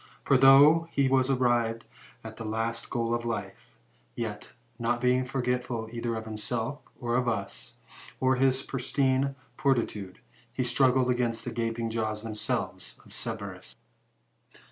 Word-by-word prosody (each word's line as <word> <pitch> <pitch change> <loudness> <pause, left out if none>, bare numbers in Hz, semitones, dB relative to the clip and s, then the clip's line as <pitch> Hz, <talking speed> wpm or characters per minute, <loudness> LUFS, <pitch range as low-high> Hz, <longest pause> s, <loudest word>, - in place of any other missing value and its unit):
For, 135 - +3
though 140 +5 +7
he 140 -3 +2
was 130 0 +3
arrived 120 -3 +1 0.4
at 110 0 -9
the 115 - -6
last 115 +1 -2
goal 115 -1 -1
of 120 0 -1
life, 110 - -5 0.4
yet, - - -5 0.3
not 120 +1 0
being 125 +1 +2
forgetful 125 -3 -2
either 115 0 -2
of 110 0 -5
himself, 110 +5 -3 0.2
or 120 -2 -1
of 125 0 +1
us, 100 -4 -3 0.4
or 130 0 +3
his 135 +1 +2
pristine 135 +1 0 0.2
fortitude, 115 -9 -1 0.3
he 130 +1 -1
struggle 130 0 +3
against 120 -2 -1
the - - -3
gaping 115 0 -2
jaws 110 -1 -2
themselves 110 -2 -3
of - - -17
Cerberus. - - -6
120 Hz, 140 wpm, -28 LUFS, 115-130 Hz, 0.4 s, though